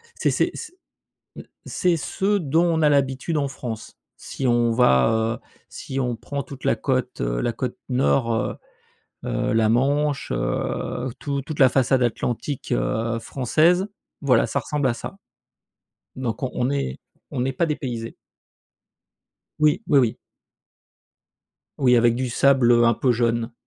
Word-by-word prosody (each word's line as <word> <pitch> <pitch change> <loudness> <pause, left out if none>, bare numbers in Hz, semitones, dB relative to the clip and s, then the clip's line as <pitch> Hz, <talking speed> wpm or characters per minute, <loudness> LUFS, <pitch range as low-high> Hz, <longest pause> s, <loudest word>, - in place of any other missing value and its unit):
c'est - - +1
c'est - - +1
c'est, - - -8 0.6
mmh, - - -8 0.2
c'est 180 -3 +1
ce 195 +6 0
dont 165 -1 +2
on 165 -2 +1
a 150 - +5
l'habitude 140 +2 +1
en 140 -1 0
France. 120 -5 -7 0.2
Si 135 - -6
on 120 -1 +3
va, 110 - +3
heu, - - -33 0.2
si 135 - -5
on 125 -2 -1
prend 140 +5 -5
toute 135 -1 -11
la - - +2
côte, 130 -2 -2
heu, - - -1
la 120 - -1
côte 125 +1 -4
nord, 125 -1 +2
heu 110 - -2 0.7
heu, - - -1
la 110 -1 +3
Manche, 140 +4 +1
heu, 130 +2 -2
tou 140 -1 -2
toute 150 +2 -7
la 130 -2 +7
façade 130 0 +2
atlantique, 120 +3 -2
heu, 110 - 0
française, 160 - +2 0.3
voilà 125 -5 +3
ça - - -2
ressemble 150 -3 -1
à 125 - +1
ça. 195 - -8 1.0
Donc, 120 -3 -3
on 125 -1 -1
est 140 - -2 0.3
on 125 -2 -2
est 135 - 0
pas 170 - +1
dépaysé. 125 -7 -4 1.4
Oui, 155 +6 +3
oui 145 - +4
oui. 120 -4 +2 1.6
Oui, 125 -2 +4
avec 120 0 +4
du 130 +1 -2
sable, 130 -1 +4
heu, 120 0 +5
un 115 0 +4
peu 130 - +1
jaune. 115 0 0
130 Hz, 155 wpm, -23 LUFS, 115-140 Hz, 1.6 s, la